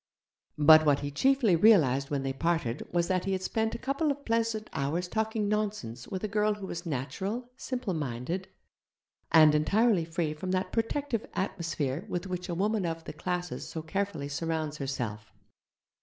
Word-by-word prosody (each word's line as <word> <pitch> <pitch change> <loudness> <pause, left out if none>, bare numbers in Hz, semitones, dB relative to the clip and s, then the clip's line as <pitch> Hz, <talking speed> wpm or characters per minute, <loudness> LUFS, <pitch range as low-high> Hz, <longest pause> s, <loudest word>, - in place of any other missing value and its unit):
But 155 +1 +8
what 145 -2 +3
he 145 0 -3
chiefly 255 - +3
realized 155 - +5
when 140 -2 -1
they 135 0 -1
parted 160 -5 -1
was 170 -1 +1
that 185 -1 0
he 195 - 0
had 185 0 -2
spent 220 +3 -1
a - - -2
couple 275 +5 -1
of 280 0 -3
pleasant 225 -1 0
hours 160 +6 -1
talking 220 +1 -1
nonsense 200 - -2
with 190 +1 -5
a - - 0
girl 210 0 +1
who 205 -2 -7
was 170 -2 -6
natural, 190 - -3
simple 250 -6 -3
minded, 150 +5 -3 0.8
and 155 -2 +7
entirely 195 +5 +3
free 160 -2 -2
from 170 +5 -6
that 185 0 0
repellently - - -28
protective 230 +1 -1
atmosphere 165 -5 -2
with 175 0 -2
which 180 0 -4
a 170 - -2
woman 205 +3 +1
of 165 0 -4
the - - -7
'classes' 175 +3 -4
so 160 - -5
carefully 195 -3 -2
surrounds 155 +1 -2
herself. 120 -7 -4
175 Hz, 175 wpm, -29 LUFS, 150-215 Hz, 0.8 s, But